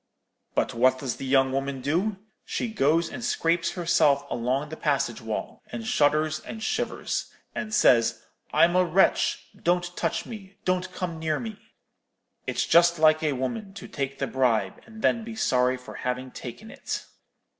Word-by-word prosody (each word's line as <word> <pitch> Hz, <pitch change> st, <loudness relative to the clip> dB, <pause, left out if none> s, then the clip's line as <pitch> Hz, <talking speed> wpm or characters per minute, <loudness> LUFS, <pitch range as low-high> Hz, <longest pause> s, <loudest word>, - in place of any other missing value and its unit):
But -, -, +1 dB
what 130 Hz, +2 st, +4 dB
does 130 Hz, -3 st, -3 dB
the 135 Hz, -, -5 dB
young 135 Hz, 0 st, +4 dB
woman 135 Hz, 0 st, -2 dB
do? 175 Hz, +10 st, 0 dB, 0.3 s
She 240 Hz, -, -3 dB
goes 160 Hz, 0 st, +3 dB
and 240 Hz, -, -7 dB
scrapes 170 Hz, -7 st, +1 dB
herself 155 Hz, -5 st, +3 dB
along 130 Hz, +5 st, -1 dB
the 160 Hz, -, -6 dB
passage -, -, 0 dB
wall, -, -, -5 dB
and 115 Hz, -2 st, -5 dB
shudders 155 Hz, +3 st, +2 dB
and 220 Hz, +6 st, -8 dB
shivers, -, -, -2 dB, 0.2 s
and 225 Hz, -3 st, -4 dB
says, 120 Hz, -, +4 dB, 0.3 s
'I'm 175 Hz, +1 st, +4 dB
a 185 Hz, -, +5 dB
wretch; 180 Hz, +2 st, +2 dB
don't 175 Hz, 0 st, 0 dB
touch 165 Hz, -, -1 dB
me—don't 190 Hz, -3 st, -3 dB
come 175 Hz, -3 st, -4 dB
near 155 Hz, -1 st, 0 dB
me.' 220 Hz, -3 st, -7 dB, 0.9 s
It's -, -, 0 dB
just 170 Hz, 0 st, +5 dB
like 155 Hz, 0 st, +5 dB
a 155 Hz, -2 st, +1 dB
woman, 195 Hz, -, -4 dB
to -, -, -8 dB
take 135 Hz, -1 st, -4 dB
the -, -, -1 dB
bribe, 115 Hz, -7 st, 0 dB
and 220 Hz, -1 st, -11 dB
then 230 Hz, -, +3 dB
be 225 Hz, 0 st, -7 dB
sorry 125 Hz, -10 st, +2 dB
for 125 Hz, -, -11 dB
having 125 Hz, +1 st, -3 dB
taken 210 Hz, -, -9 dB
it.' -, -, -5 dB
155 Hz, 165 wpm, -26 LUFS, 130-185 Hz, 0.9 s, a